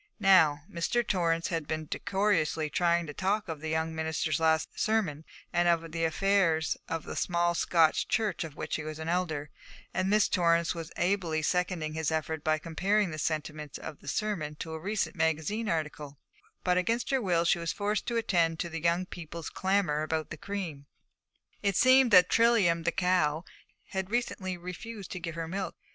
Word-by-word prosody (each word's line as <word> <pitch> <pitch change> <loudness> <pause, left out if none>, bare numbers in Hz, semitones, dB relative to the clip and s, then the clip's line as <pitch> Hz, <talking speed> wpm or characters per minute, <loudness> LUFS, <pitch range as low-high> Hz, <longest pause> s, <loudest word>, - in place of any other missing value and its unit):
Now, 165 -8 +5
Mr. 200 +8 -1
Torrance 165 -3 +1
had 165 -4 -2
been 155 0 -3
decorously 165 -5 0
trying 170 -1 +2
to 150 - -7
talk 195 +6 0
of 160 -3 -5
the 160 - -4
young 160 +1 -1
minister's 160 -1 -1
last 160 -1 +2
sermon 185 -9 0 0.3
and 175 0 +3
of 165 -1 +1
the 165 0 0
affairs 165 -2 +2
of 165 -1 -2
the - - -7
small 175 -1 +1
Scotch 165 -2 +3
church 215 -5 0
of 155 -3 -8
which - - -3
he 155 - -5
was 155 0 -6
an 160 0 -6
elder, 160 -4 -1 0.4
and 185 0 0
Miss 210 0 +4
Torrance 170 -2 +2
was 165 -2 -7
ably 175 -4 0
seconding 180 -3 0
his 160 -1 -1
effort 160 0 -2
by 155 0 +2
comparing 190 +5 0
the 155 - -5
sentiments 150 -1 -3
of 150 - -8
the - - -16
sermon 185 -9 -2
to 160 +1 -6
a 160 - -5
recent 205 +5 -2
magazine 160 +7 0
article, 150 -3 -3 0.5
but 180 0 +3
against 230 +8 -1
her 270 -1 +2
will 175 -5 +1
she 170 - +3
was 170 -2 -2
forced 205 +5 -2
to 235 - 0
attend 170 -7 +1
to 170 - -3
the 165 -1 -5
young 170 +2 +1
people's 170 -2 -7
clamour 190 -6 +1
about 155 0 -2
the - - -4
cream. 170 -7 -5 0.7
It 200 -2 +1
seemed 255 +3 +6
that 180 -4 +7
Trilium, 200 -8 +3
the 170 - +3
cow, 180 -3 +1 0.4
had 190 -1 -3
recently 200 -6 -2
refused 185 +4 -8
to 185 - -4
give 165 -1 -5
her 165 -1 -4
milk. 190 +3 -4
170 Hz, 185 wpm, -29 LUFS, 160-190 Hz, 0.7 s, that